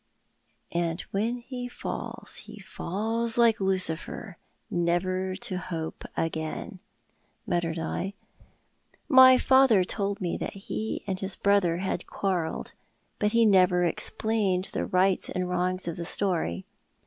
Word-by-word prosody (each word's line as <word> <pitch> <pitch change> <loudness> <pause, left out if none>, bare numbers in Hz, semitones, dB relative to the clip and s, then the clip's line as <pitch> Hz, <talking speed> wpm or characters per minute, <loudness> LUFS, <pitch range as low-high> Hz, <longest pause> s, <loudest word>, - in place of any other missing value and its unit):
" - - -45
' - - -41
And 170 0 -1
when 225 +5 0
he 245 0 -6
fall?, 245 - -6
he - - -10
falls 225 +5 -2
like 230 -3 +4
Lucifer, 185 0 -2 0.3
Never 185 +2 0
to 185 -1 -4
hope 170 -4 -5
again.' 165 +5 -3 0.3
" - - -42
muttered 170 -1 -1
I. 180 +4 -3 0.5
" - - -44 0.2
My 260 -2 +9
fatlier 260 -7 +5
told 200 0 -2
me 175 -3 -2
that - - -4
he 215 +2 -4
and 190 -2 -2
his 195 0 -1
brother 200 -4 +2
had 180 -1 -3
quarrelled; 180 -5 -2 0.5
but 210 +1 +1
he 230 0 +5
never 185 -3 +5
explained 190 +2 0
the - - -1
rights 185 +1 +2
and 180 0 -2
wrongs 180 0 -1
of 170 - -3
the 170 - -4
story." 165 - -1
185 Hz, 140 wpm, -27 LUFS, 175-210 Hz, 0.5 s, My